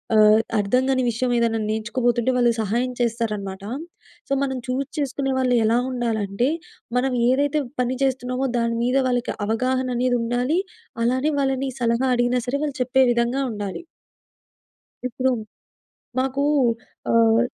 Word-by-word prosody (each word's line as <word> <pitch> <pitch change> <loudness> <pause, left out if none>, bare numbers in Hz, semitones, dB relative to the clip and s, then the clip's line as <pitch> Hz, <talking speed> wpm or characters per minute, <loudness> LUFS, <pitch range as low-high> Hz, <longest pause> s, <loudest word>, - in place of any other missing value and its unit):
ఆహ్, 215 0 +7 0.2
అర్థం 250 +6 +2
కాని 260 -1 +2
విషయం 245 +2 -1
ఏదన్నా, 230 -1 +1
నేర్చుకోబోతుంటే, 235 +2 0
వాళ్ళు 240 -1 +4
సహాయం 235 +5 0
చేస్తారనమాట. 210 -5 -2 0.6
సో, - - -1
మనం 265 -1 -2
చూజ్ 260 +2 -1
చేసుకునే 275 -1 -1
వాళ్ళు 250 -1 +2
ఎలా 225 +2 +3
ఉండాలంటే, 230 -2 -1 0.5
మనం 260 +1 +1 0.2
ఏదైతే 285 +3 +2 0.2
పని 250 +1 -1
చేస్తున్నామో, 260 0 0
దాని 235 0 0
మీద 250 +2 +2
వాళ్ళకి 245 -1 0
అవగాహన 255 +4 0
అనేది 245 0 +2
ఉండాలి. 245 +8 0 0.4
అలానే 255 +4 +1
వాళ్ళని 270 0 0
సలహా 235 +2 +1
అడిగినా 245 +1 +2
సరే! 265 +3 0
వాళ్ళు 290 -3 -2
చెప్పే 260 +1 +3
విధంగా 235 +3 0
ఉండాలి. 205 -3 -5 1.3
ఇప్పుడు 255 +1 0 0.9
మాకూ 265 +2 0 0.7
ఆహ్, 230 0 +5
245 Hz, 130 wpm, -23 LUFS, 230-260 Hz, 1.3 s, ఆహ్